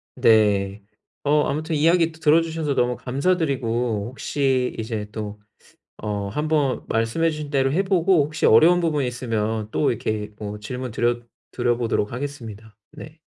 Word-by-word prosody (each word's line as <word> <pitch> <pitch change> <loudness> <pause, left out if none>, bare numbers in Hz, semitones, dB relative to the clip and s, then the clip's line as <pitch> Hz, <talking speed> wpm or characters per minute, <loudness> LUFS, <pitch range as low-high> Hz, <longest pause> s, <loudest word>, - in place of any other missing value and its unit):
네. 105 -2 +3 0.4
어 150 +1 +3
아무튼 155 +3 -2
이야기 165 +2 +3
들어주셔서 160 -1 +1
너무 125 0 +1
감사드리고 125 - -1
혹시 130 -1 -1
이제 110 -2 -4
또 105 -1 -6 0.6
어 105 -1 -3
한번 150 +3 0
말씀해 115 +9 +1
주신 150 -1 -6
대로 135 -1 +1
해 190 +5 +2
보고 185 -4 +3
혹시 150 +2 -1
어려운 165 +11 +6
부분이 155 -5 0
있으면 110 -3 -2
또 145 - +2
이렇게 105 -2 -3
뭐 105 0 -6
질문드려 120 0 -2 0.3
드려 120 -1 0
보도록 115 -2 -1
하겠습니다. 115 -6 -7 0.2
네. 155 +1 -11
130 Hz, 310 characters per minute, -23 LUFS, 110-155 Hz, 0.6 s, 어려운